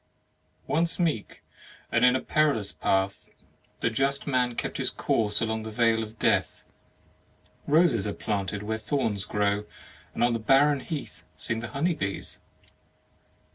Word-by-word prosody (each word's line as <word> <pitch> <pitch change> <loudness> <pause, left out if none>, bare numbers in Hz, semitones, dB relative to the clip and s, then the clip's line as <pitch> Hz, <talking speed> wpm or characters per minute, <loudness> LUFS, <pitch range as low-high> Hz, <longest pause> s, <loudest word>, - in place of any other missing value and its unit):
Once 165 +1 +1
meek, 155 - -1 0.5
and - - +2
in 125 0 +6
a 130 - 0
perilous 145 -10 +1
path 95 0 -1 0.5
The 115 - +1
just 135 +4 0
man 125 -3 +1
kept - - -3
his - - 0
course 105 -2 0
along 110 -1 -1
The 110 - -6
Vale 115 0 +2
of 110 0 -7
Death. - - +1 1.0
Roses 145 - +3
are 100 - -2
planted 100 -1 -3
where 110 +1 -2
thorns 110 -7 -1
grow, 105 0 0 0.5
And - - +1
on 120 0 +3
the 115 - -1
barren 135 +5 +4
heath 150 +1 -6
Sing 115 -1 -1
the 120 - -5
honey 145 +8 0
bees. 100 -9 -4
115 Hz, 145 wpm, -27 LUFS, 105-140 Hz, 1.0 s, in